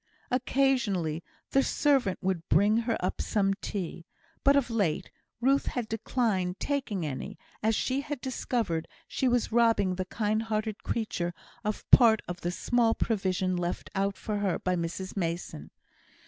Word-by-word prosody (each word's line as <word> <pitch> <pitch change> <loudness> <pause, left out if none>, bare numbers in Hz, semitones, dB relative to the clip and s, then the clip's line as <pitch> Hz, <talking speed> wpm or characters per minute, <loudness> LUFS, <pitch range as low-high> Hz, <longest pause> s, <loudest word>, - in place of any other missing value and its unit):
Occasionally 240 - +1 0.3
the 270 - +5
servant 270 -9 +2
would 180 -3 -1
bring 205 +7 +4
her 230 0 0
up - - -2
some 195 -2 +1
tea; 175 -3 -4 0.4
but 280 0 +6
of 265 -4 +2
late 200 -9 0 0.3
Ruth 270 +3 +2
had 245 -3 -2
declined 215 -5 -1
taking 245 - -1
any, 155 +8 -5 0.2
as 220 +1 +2
she 265 +5 0
had 290 -1 -5
discovered 235 -10 -2 0.2
she 260 - 0
was 245 -2 +1
robbing 225 -5 +3
the 185 0 -3
kind 215 +2 0
hearted 215 -1 -2
creature 175 -6 -2 0.3
of 210 -1 -3
part 225 -4 +7
of 175 0 -5
the 175 - -1
small 230 +5 +2
provision 185 -4 0
left 175 0 -3
out 195 0 0
for 210 -1 -3
her 200 -4 0
by 185 0 0
Mrs 175 +2 -4
Mason. 165 - -3
210 Hz, 150 wpm, -29 LUFS, 180-240 Hz, 0.4 s, part